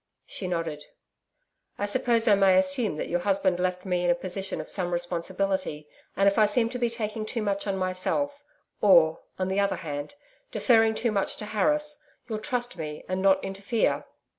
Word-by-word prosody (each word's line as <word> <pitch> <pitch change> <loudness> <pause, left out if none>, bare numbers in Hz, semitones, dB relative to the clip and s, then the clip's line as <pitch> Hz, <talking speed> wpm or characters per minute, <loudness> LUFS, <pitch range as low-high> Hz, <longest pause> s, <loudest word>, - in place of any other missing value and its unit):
She 185 - -5
nodded. 165 -4 -3 0.9
'I 205 - -1
suppose 235 +1 +2
I 210 - +7
may 195 -2 +5
assume 275 - +1
that - - -3
your 175 - 0
husband 190 -1 +1
left 180 +1 -1
me 180 -2 0
in 175 - +2
a 175 - +4
position 190 +2 -3
of 155 - -6
some 180 -3 -1
responsibility. 175 -2 -2 0.3
And 195 +1 +4
if 200 +2 +3
I 215 - +6
seem 225 +2 +2
to 250 +1 -5
be 240 -1 +1
taking 220 -1 -3
too 220 +1 -3
much 200 0 -1
on 195 -1 -1
myself 190 +11 -1 0.4
or, 170 -5 +5 0.2
on 185 - -1
the 190 +1 0
other 200 0 +1
hand, 145 - -6 0.4
deferring 225 -3 +3
too 230 +1 0
much 200 -2 -1
to 210 - -7
Harris, 300 +8 0 0.3
you'll 220 -3 -3
trust 245 0 -3
me 150 -2 -6
and 185 0 -2
not 195 0 +4
interfere?' 200 +4 -1
195 Hz, 190 wpm, -27 LUFS, 180-225 Hz, 0.9 s, I